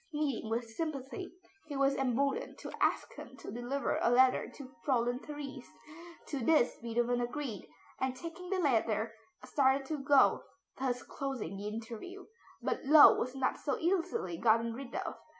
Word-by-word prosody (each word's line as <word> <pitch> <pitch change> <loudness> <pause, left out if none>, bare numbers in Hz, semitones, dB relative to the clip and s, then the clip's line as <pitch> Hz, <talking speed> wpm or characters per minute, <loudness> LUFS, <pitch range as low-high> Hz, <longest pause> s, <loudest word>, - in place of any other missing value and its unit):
Meeting 290 -7 -1
with 230 +1 -1
sympathy, 290 +7 -5 0.4
he 290 -2 -4
was 275 0 +3
emboldened 270 +1 0
to - - -8
ask - - +1
him - - -11
to - - -8
deliver 245 +5 -1
a - - +3
letter 255 +1 +4
to 270 -2 -11
Fräulein 245 -2 +1
Therese. 290 -3 -7 0.6
To 285 - -2
this 255 0 +3
Beethoven 240 +1 0
agreed, 240 - -4 0.3
and, 260 -1 -1
taking 345 +4 -8
the 385 - 0
letter, 230 - +1 0.3
started 270 -1 +2
to 300 +1 -3
go, 275 0 +5 0.4
thus 250 -2 -1
closing 265 -10 -4
the 200 +1 -5
interview. 230 - -7 0.4
But - - -1
Löwe 300 +2 +9
was 255 +2 -3
not 265 -1 0
so 285 - -1
easily 330 - -1
gotten 230 0 +3
rid 260 +1 -8
of. - - -3
265 Hz, 155 wpm, -33 LUFS, 235-290 Hz, 0.6 s, Löwe